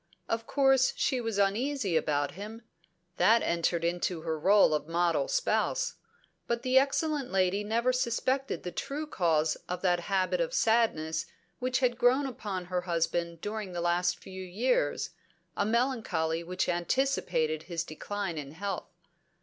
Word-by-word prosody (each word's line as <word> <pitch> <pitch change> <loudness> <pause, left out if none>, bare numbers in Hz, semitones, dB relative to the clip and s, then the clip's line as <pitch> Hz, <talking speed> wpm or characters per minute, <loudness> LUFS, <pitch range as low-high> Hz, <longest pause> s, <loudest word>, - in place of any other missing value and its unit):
Of 225 0 -2
course 270 -2 +4
she 255 -2 +1
was 225 -3 -2
uneasy 205 - +1
about 145 -2 +1
him; 215 +5 -8 0.5
that 220 +6 +5
entered 170 0 0
into 175 0 -1
her 160 -1 -3
role 195 0 +5
of 150 0 -1
model 170 - +1
spouse: - - 0 0.5
but 235 0 -1
the 260 0 +5
excellent 285 0 0
lady 190 +1 +2
never 235 +4 +1
suspected 255 +2 -1
the 180 - -4
true 295 - -4
cause 165 - +1
of 180 +1 -4
that 175 -2 +3
habit 195 - +1
of - - -1
sadness 220 -9 +1 0.3
which 255 +1 0
had 245 -1 +1
grown 255 +4 +4
upon 205 -8 -4
her 180 0 -1
husband 170 -1 -1
during 210 -3 -4
the 175 - -3
last 175 +1 +1
few 190 0 -9
years, 230 - 0 0.4
a 205 - 0
melancholy 215 -10 0
which 180 +2 -2
anticipated 175 - 0
his 170 -1 -1
decline 175 +1 -4
in 140 0 -8
health. 195 +4 -4
200 Hz, 150 wpm, -30 LUFS, 170-250 Hz, 0.5 s, that